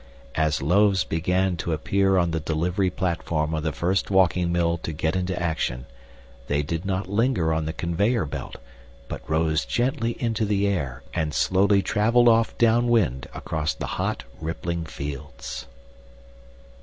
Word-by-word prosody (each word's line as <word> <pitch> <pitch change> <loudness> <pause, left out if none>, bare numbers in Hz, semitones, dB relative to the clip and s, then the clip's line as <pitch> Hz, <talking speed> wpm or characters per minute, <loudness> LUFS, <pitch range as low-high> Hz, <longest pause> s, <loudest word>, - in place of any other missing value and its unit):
As 75 -2 +1
loaves 95 +4 +4
began 90 +2 0
to 85 0 -2
appear 95 +5 +2
on 85 -2 +2
the 80 - -1
delivery 85 +5 0
platform 85 -4 -1
of 80 - -1
the 80 0 -1
first 90 +8 0
walking 90 -2 +3
mill 85 -1 +1
to 80 - -4
get 80 +2 -1
into 90 0 -1
action, 80 -7 -2 0.6
they 70 +1 +1
did 80 +5 -3
not 95 0 -1
linger 100 -5 +1
on 80 0 -1
the - - -1
conveyor 90 +6 0
belt, 70 - -6 0.5
but - - -6
rose 80 -1 +2
gently 120 -1 0
into 115 -2 0
the 100 -1 +1
air 70 -10 -2
and 75 -1 -1
slowly 100 +1 +3
traveled 115 +3 +4
off 115 0 +2
down 120 +1 +4
wind 90 - +1
across 80 -1 -2
the - - -4 0.2
hot - - -2 0.2
rippling 85 +1 -3
fields. 70 -4 -7
85 Hz, 155 wpm, -25 LUFS, 80-100 Hz, 0.6 s, loaves